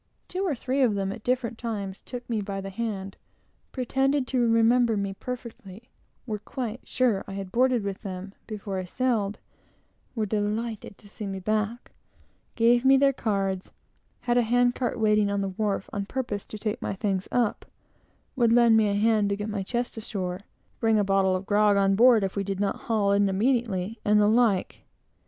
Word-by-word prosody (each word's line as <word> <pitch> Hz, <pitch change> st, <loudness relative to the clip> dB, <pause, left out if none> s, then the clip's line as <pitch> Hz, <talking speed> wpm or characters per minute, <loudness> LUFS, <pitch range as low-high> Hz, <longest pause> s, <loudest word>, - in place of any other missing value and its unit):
Two 370 Hz, +2 st, -3 dB
or 305 Hz, -, 0 dB
three 260 Hz, +3 st, -1 dB
of 235 Hz, -6 st, +3 dB
them, 195 Hz, -1 st, -1 dB
at 215 Hz, +2 st, -8 dB
different 250 Hz, -2 st, -1 dB
times, 200 Hz, -5 st, -4 dB
took 245 Hz, -1 st, -8 dB
me 225 Hz, -3 st, -1 dB
by 195 Hz, -1 st, -4 dB
the 195 Hz, 0 st, -6 dB
hand; 195 Hz, -2 st, -4 dB, 0.6 s
remembered 245 Hz, -3 st, +2 dB
me 200 Hz, -1 st, -2 dB
perfectly; 235 Hz, -1 st, -8 dB, 0.4 s
were 215 Hz, -4 st, -3 dB
quite 240 Hz, +1 st, -5 dB
sure 235 Hz, -7 st, +1 dB
I 195 Hz, -, -7 dB
had 195 Hz, -1 st, -6 dB
boarded 250 Hz, -1 st, +2 dB
with 200 Hz, -1 st, -4 dB
them 195 Hz, -1 st, -7 dB
before 200 Hz, -3 st, -4 dB
I -, -, -3 dB
sailed; 220 Hz, -1 st, -1 dB, 0.8 s
were 220 Hz, -2 st, 0 dB
delighted 210 Hz, +1 st, -3 dB
to 205 Hz, -, -18 dB
see 210 Hz, 0 st, -7 dB
me 195 Hz, -1 st, -4 dB
back; 215 Hz, +4 st, -2 dB, 0.6 s
gave 240 Hz, +1 st, +4 dB
me 270 Hz, 0 st, +6 dB
their 275 Hz, 0 st, +4 dB
cards; 195 Hz, -6 st, -2 dB, 0.5 s
had 245 Hz, 0 st, +2 dB
a -, -, +5 dB
hand 245 Hz, +1 st, +3 dB
cart 245 Hz, -1 st, -2 dB
waiting 210 Hz, -1 st, +3 dB
on 200 Hz, 0 st, 0 dB
the 195 Hz, -, -1 dB
wharf, 200 Hz, 0 st, -2 dB
on 200 Hz, -1 st, -3 dB
purpose 235 Hz, -6 st, -4 dB
to 215 Hz, -, -7 dB
take 210 Hz, +1 st, -3 dB
my -, -, -3 dB
things 195 Hz, -2 st, -1 dB
up: 240 Hz, -4 st, 0 dB, 0.7 s
would 235 Hz, -3 st, +3 dB
lend 235 Hz, -1 st, +6 dB
me 220 Hz, -1 st, +4 dB
a 200 Hz, -, 0 dB
hand 210 Hz, -1 st, +2 dB
to 200 Hz, -, 0 dB
get 210 Hz, +1 st, -4 dB
my 205 Hz, -2 st, -2 dB
chest 240 Hz, +4 st, -3 dB
ashore; 185 Hz, -5 st, -4 dB, 0.4 s
bring 225 Hz, -1 st, +3 dB
a 205 Hz, -, +3 dB
bottle 195 Hz, -1 st, +2 dB
of 185 Hz, +1 st, -4 dB
grog 205 Hz, 0 st, +3 dB
on 195 Hz, 0 st, +3 dB
board 230 Hz, +1 st, +6 dB
if 195 Hz, -, -2 dB
we 200 Hz, -, -1 dB
did 195 Hz, -1 st, -4 dB
not 200 Hz, -1 st, 0 dB
haul 210 Hz, -3 st, +2 dB
in 200 Hz, 0 st, +3 dB
immediately, 220 Hz, -1 st, 0 dB
and 210 Hz, 0 st, +4 dB
the 205 Hz, -, +4 dB
like. 220 Hz, -4 st, +2 dB
215 Hz, 190 wpm, -26 LUFS, 200-240 Hz, 0.8 s, me